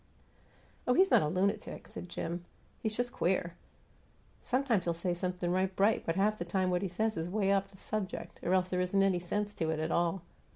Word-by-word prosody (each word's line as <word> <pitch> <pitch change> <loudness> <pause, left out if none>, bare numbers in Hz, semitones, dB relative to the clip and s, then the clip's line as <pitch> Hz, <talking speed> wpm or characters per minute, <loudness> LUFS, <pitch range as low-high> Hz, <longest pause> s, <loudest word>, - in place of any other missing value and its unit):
"Oh, 250 - +4
he's 385 +1 +5
not - - +7
a 150 - +1
lunatic," 195 +6 -1
said 180 - -6
Jim. 175 0 -4 0.4
"He's 215 -1 -2
just 245 0 0
queer. 175 -1 0 0.9
Sometimes 250 -7 +1
he'll 170 -1 0
say 175 +1 -1
something 180 0 -2
right 185 +1 +1
bright, 205 +3 +2
but 165 - +1
half 210 +2 +2
the - - -1
time 185 +1 +1
what 180 0 +1
he 195 - 0
says 215 +5 -1
is 165 +2 -2
'way 200 0 +2
off 195 0 +1
the 195 -1 -18
subject, 210 -1 -4
or 180 +2 +2
else 185 0 +1
there 180 0 +1
isn't 195 +2 +2
any 190 -2 +3
sense 205 +4 -2
to 160 -4 -1
it 160 - 0
at 160 +1 -1
all. 170 +1 +1
185 Hz, 215 wpm, -32 LUFS, 175-205 Hz, 0.9 s, not